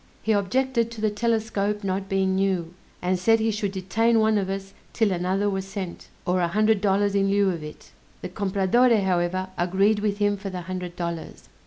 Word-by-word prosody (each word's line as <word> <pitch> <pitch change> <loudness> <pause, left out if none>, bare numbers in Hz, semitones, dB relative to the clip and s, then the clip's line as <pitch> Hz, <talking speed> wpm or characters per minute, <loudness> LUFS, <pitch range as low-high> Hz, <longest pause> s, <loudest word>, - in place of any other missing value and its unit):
He 220 - +1
objected 230 +4 +1
to 230 -1 -9
the 215 -1 +1
telescope 210 -2 -1
not 195 0 -2
being 190 -1 +1
new; 190 -3 0 0.3
and 180 0 +1
said 225 +5 +4
he 220 0 +1
should 205 -2 -2
detain 225 +5 +1
one 220 -1 +3
of 190 -1 -2
us 195 0 -5 0.2
'till 220 -3 +2
another 185 +3 0
was 195 -1 -2
sent, 195 -3 -6 0.2
or 180 0 +1
a 170 - +2
hundred 215 +3 +2
dollars 200 0 +2
in 195 -1 +2
lieu 200 -1 +3
of 170 -3 -5
it. 150 - -10 0.3
The - - -4
Compradore 205 +4 +2
however 185 0 0
agreed 195 +4 +2
with 205 -1 -1
him 205 0 +1
for 195 0 -6
the 185 -1 -5
hundred 180 0 -6
dollars. 170 -2 -6
195 Hz, 195 wpm, -25 LUFS, 185-215 Hz, 0.3 s, said